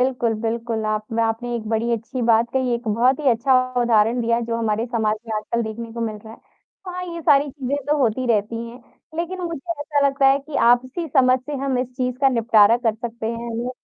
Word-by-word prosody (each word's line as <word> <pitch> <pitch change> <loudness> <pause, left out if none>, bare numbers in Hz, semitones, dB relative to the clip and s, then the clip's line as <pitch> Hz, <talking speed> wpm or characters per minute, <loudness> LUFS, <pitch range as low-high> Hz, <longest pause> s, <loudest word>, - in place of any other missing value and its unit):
बिल्कुल, 245 -3 +1
बिल्कुल, 225 -1 -2
आप 215 0 -1
न 225 - -2
आपने 230 +2 -1
एक 220 -2 -6
बड़ी 225 +1 0
अच्छी 230 +2 -3
बात 230 +1 +4
कही, 260 -2 0
एक 235 0 -6
बहुत 245 +6 +2
ही 280 - +2
अच्छा 240 +4 +1 0.3
उदाहरण 235 0 +3
दिया 230 0 +1
जो 230 - -1
हमारे 225 0 -1
समाज 220 -3 0
में 220 - -3
आजकल 235 +2 -2
देखने 225 +1 -6
को 235 - -6
मिल 215 - -5
रहा 220 - -10
है। - - -14 0.5
हाँ, 360 0 -5
ये 335 - -5
सारी 290 -2 +4
चीज़ें 275 0 -3
तो 300 - +4
होती 255 0 +1
रहती 220 0 0
हैं, 245 - -12 0.4
लेकिन 345 +2 -3
मुझे 335 -1 -5
ऐसा 290 -1 +1
लगता 275 0 +2
है 270 +1 +5
कि 280 +1 -7
आपसी 255 +7 +1
समझ 255 -2 +4
से 295 +3 -8
हम 265 -2 0
इस 250 - -2
चीज़ 250 -1 -2
का 275 - +5
निपटारा 230 -3 +4
कर 220 - +3
सकते 230 0 -6
हैं 230 +1 -4
हम 230 0 -4
ल - - -3
235 Hz, 230 wpm, -22 LUFS, 225-265 Hz, 0.5 s, है